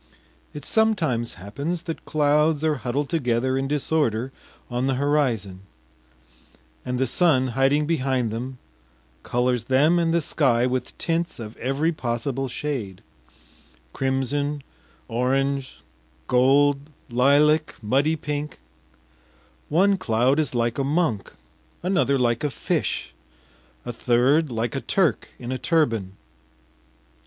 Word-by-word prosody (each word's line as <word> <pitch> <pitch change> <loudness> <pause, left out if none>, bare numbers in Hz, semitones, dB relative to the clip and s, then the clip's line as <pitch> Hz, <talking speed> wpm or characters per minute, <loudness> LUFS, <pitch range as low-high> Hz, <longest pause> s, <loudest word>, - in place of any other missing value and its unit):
It 145 -1 -9
sometimes 165 - +1
happens 140 - -4
that 165 -2 -6
clouds 150 +1 +2
are 155 -2 +1
huddled 135 +3 -2
together 130 -4 0
in 135 0 -1
disorder 135 -4 0 0.4
on 125 +1 -1
the 135 - +1
horizon, 125 -9 0 1.2
and 125 0 -3
the 130 - +1
sun 130 -2 +3
hiding 135 +4 +2
behind 130 -7 0
them 125 +4 -5 0.6
colors 125 - 0
them 150 +7 +3
and 165 -1 +1
the 170 - +3
sky 130 -6 +2
with 125 -1 -3
tints 170 0 -1
of 110 -1 -7
every 135 +6 0
possible 135 -1 -2
shade 125 -9 -4 0.9
crimson, 140 +2 -1 0.4
orange, 135 +3 -1 0.5
gold, 140 +3 +4 0.3
lilac, 145 +5 +3
muddy 135 +8 +1
pink; 150 0 -4 1.1
one 195 +4 +3
cloud 125 0 +2
is 150 -5 -1
like 120 +2 0
a - - +1
monk, 140 - 0 0.5
another 180 -7 +2
like 120 -1 +1
a 150 - +1
fish, - - -2 0.7
a 120 - -4
third 130 +6 +2
like 115 0 -2
a 135 - -2
Turk 185 -6 +1
in 125 0 -6
a 130 - -3
turban. 115 - +1
135 Hz, 120 wpm, -24 LUFS, 120-150 Hz, 1.2 s, gold